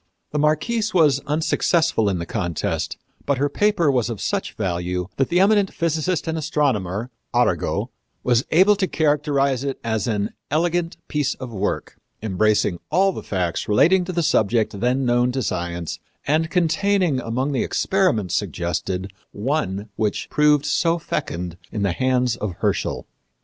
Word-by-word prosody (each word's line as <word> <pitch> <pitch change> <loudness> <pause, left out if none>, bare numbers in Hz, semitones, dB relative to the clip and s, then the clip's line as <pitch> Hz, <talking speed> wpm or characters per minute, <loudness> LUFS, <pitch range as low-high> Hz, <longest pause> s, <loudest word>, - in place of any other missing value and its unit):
The 150 - -1
Marquise 205 +9 +1
was 150 -6 +5
unsuccessful 160 - +2
in 95 - 0
the 85 - -4
contest, 85 -4 -2 0.3
but 140 -1 +2
her 145 +2 +1
paper 185 -2 +2
was 125 -3 +1
of 115 -4 -4
such - - -2
value 90 -2 -2
that 135 - +1
the 175 - +3
eminent 200 0 +4
physicist 165 +1 -1
and 160 0 -1
astronomer, 125 - -1 0.2
Arago, - - +1 0.3
was 120 0 +3
able 190 +5 +5
to 190 -2 +1
characterize 145 -4 +1
it 140 -1 -3
as 110 -2 -1
an 105 -3 -1 0.2
"elegant 170 +3 0
piece 150 -2 0
of 125 -2 -8
work, 100 0 -3 0.3
embracing 105 -3 +1
all 195 +2 +3
the - - -6
facts 90 -4 -2
relating 175 - +4
to 185 - -4
the 170 -1 0
subject 110 -5 +1
then 125 +4 +1
known 120 0 +2
to 130 -1 -1
science 85 -3 -3 0.3
and 160 +3 +1
containing 180 -2 +2
among 125 +4 -2
the 135 - 0
experiments 180 - +1
suggested 90 +2 -2 0.2
one 105 -4 -2
which 105 -2 -1
proved 150 -1 +4
so 165 +3 +2
fecund 90 - -4
in 105 - -2
the 100 - +2
hands 125 +1 +1
of 105 -5 -3
Herschel." - - -1
135 Hz, 155 wpm, -22 LUFS, 105-160 Hz, 0.3 s, was